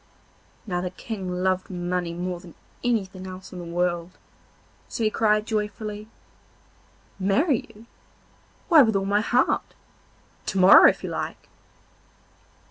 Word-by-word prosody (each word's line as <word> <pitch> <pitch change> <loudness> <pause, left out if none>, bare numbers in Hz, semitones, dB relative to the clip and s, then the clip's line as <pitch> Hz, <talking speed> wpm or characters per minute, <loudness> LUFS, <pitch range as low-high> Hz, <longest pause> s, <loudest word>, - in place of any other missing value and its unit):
Now 180 -4 -2
the 180 - -3
King 190 0 -6
loved 185 0 0
money 175 -1 -2
more 175 +1 -4
than 175 -2 -14 0.3
anything 195 -6 -2
else 185 0 -10
in 180 - -7
the 175 - -7
world, 175 +1 -2 0.7
so 230 - -4
he 215 - +2
cried 215 -1 +2
joyfully: 210 -1 -4 1.1
'Marry 230 - +1
you? 215 +2 -16 0.8
why 330 -5 +8
with 220 -5 +3
all 195 0 +1
my 205 +1 +2
heart! 245 +3 +1 0.7
to - - -2
morrow 185 +1 +9
if - - -4
you - - -4
like. - - -5
190 Hz, 130 wpm, -24 LUFS, 180-215 Hz, 1.1 s, morrow